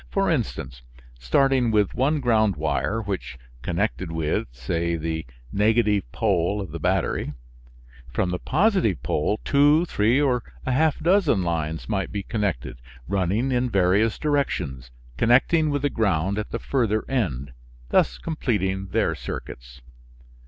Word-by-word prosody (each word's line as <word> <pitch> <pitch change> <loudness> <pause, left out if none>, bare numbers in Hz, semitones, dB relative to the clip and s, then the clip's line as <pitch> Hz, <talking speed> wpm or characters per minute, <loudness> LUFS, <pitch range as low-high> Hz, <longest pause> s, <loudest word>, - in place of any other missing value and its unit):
For 195 -2 +1
instance, 110 - -3 0.4
starting 125 - +2
with 105 -3 +2
one 145 +4 +1
ground 110 -5 +3
wire 115 +2 -1
which 95 -10 -4 0.2
connected 90 - -2
with, 80 -5 -1
say, 85 +8 -2
the 80 -2 -3 0.2
negative 105 - +2
pole 100 -1 +1
of 95 -6 -5
the 85 - -5
battery, 75 - 0 0.8
from 90 +8 0
the 90 - -2
positive 180 - +1
pole 105 +8 0
two, 145 +4 +4
three 115 -3 +2
or 130 -4 +2 0.2
a 130 - 0
half 150 +3 +2
dozen 165 - +2
lines 80 -2 -2
might 95 -3 -2
be 100 -1 -3
connected, 95 - -2 0.3
running 100 +7 0
in 125 0 +1
various 100 +2 +2
directions, 90 - -1 0.3
connecting 145 - +3
with 145 -1 -1
the 145 - +2
ground 100 -2 0
at 105 - -4
the - - -3
further 110 -5 0
end, 70 - -2 0.4
thus - - +2
completing 95 - -2
their - - +1
circuits. - - -8
105 Hz, 140 wpm, -24 LUFS, 85-130 Hz, 0.8 s, two